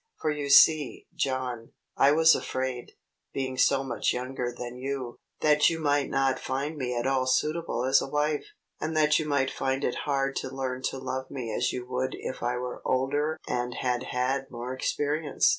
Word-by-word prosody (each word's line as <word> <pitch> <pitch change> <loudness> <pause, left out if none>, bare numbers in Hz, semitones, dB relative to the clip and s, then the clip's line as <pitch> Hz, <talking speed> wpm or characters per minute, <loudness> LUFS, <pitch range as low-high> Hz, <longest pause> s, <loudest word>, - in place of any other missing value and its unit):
For 155 - 0
you 145 -1 -3
see, 150 -1 +6
John, 130 -3 -2 0.2
I 140 - +5
was 160 +1 +6
afraid, 130 -1 -3 0.4
being 130 -1 -2
so 135 +1 +3
much 120 -5 0
younger 125 0 -3
than 120 0 -7
you, 130 -2 -4 0.2
that 150 -1 +5
you 165 - -3
might 145 -2 +1
not 135 -1 +1
find 140 +4 -3
me 125 -4 -2
at 120 - -1
all 130 -1 +1
suitable 150 -1 0
as 135 +1 +5
a - - -3
wife, 150 +1 0 0.3
and 155 0 -2
that 150 0 +4
you 155 - -2
might 135 -2 +1
find 135 +1 -1
it 125 - -2
hard 140 -1 +1
to - - -3
learn 130 -1 -3
to - - -6
love 130 0 -4
me 120 -5 -5
as 120 - +1
you 125 -1 -5
would 130 +1 -2
if 130 - -6
I 120 +1 0
were 125 0 -5
older 145 +4 0
and 125 0 -2
had 125 -1 0
had 130 +2 -1
more 120 +1 -5
experience. 145 +3 +1
130 Hz, 190 wpm, -28 LUFS, 125-145 Hz, 0.4 s, see